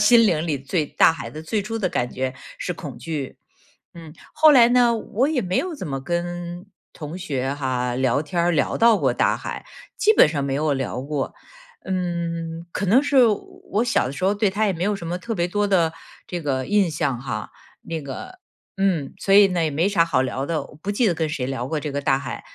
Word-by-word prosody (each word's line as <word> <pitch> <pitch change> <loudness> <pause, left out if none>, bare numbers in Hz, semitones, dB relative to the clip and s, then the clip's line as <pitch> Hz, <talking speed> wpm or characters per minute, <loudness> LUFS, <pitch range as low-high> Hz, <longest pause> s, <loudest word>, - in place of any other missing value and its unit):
心 230 +1 +6
灵 165 -3 +1
里 150 -3 0
对 145 +4 -1
大 160 - +4
海 - - -7
的 155 +1 -8
最 210 +7 -1
初 225 +3 -4
的 190 - 0
感 120 0 -1
觉 130 0 -2 0.3
是 180 - -3
恐 150 -8 -8
惧。 150 -5 -5 0.6
嗯， 165 -2 -11 0.2
后 310 -1 +6
来 240 -4 +7
呢， 245 -1 +4
我 230 +4 0
也 285 -6 0
没 185 -2 -1
有 365 -2 -1
怎 190 - -6
么 135 -1 -3
跟 175 +3 -4 0.3
同 155 +3 -7
学 135 -6 -2
哈， 125 -3 -2
聊 130 +2 +1
天 170 +3 -2
儿 175 - +3
聊 155 - 0
到 230 -1 +5
过 - - +1
大 - - +2
海， - - -6 0.3
基 435 - +4
本 400 - +7
上 145 -3 -2
没 135 -1 -1
有 150 +1 +1
聊 130 -1 -3
过。 140 -1 -3 0.5
嗯， 170 -2 -3
可 200 - -2
能 235 +9 +4
是 275 -3 +5
我 215 -2 +3 0.4
我 215 +4 +2
小 235 - +1
的 135 - -5
时 180 - -6
候 195 +2 +3
对 205 -1 +1
它 210 +3 0
也 - - +2
没 175 +1 -2
有 205 0 +1
什 170 - -8
么 175 +2 -2
特 225 +5 -4
别 175 -2 +1
多 205 +1 0
的 170 -5 +3 0.3
这 175 -1 -5
个 135 -4 -1
印 205 -4 +2
象 145 -6 -2
哈， 115 -6 -5 0.3
那 165 -2 -5
个 145 - -8 0.4
嗯， 185 -8 0
所 195 - +1
以 200 0 +8
呢 180 -3 -1
也 - - 0
没 160 +7 +1
啥 170 -5 +3
好 145 -6 +1
聊 130 +1 -2
的， 160 -2 -1
我 140 - -15
不 200 - -5
记 215 +4 +1
得 185 - +3
跟 160 -1 -1
谁 140 -4 -3
聊 130 -1 -3
过 155 - -2
这 150 - -4
个 140 - -2
大 135 -1 +2
海。 135 -2 -6
170 Hz, 250 characters per minute, -23 LUFS, 140-200 Hz, 0.6 s, 以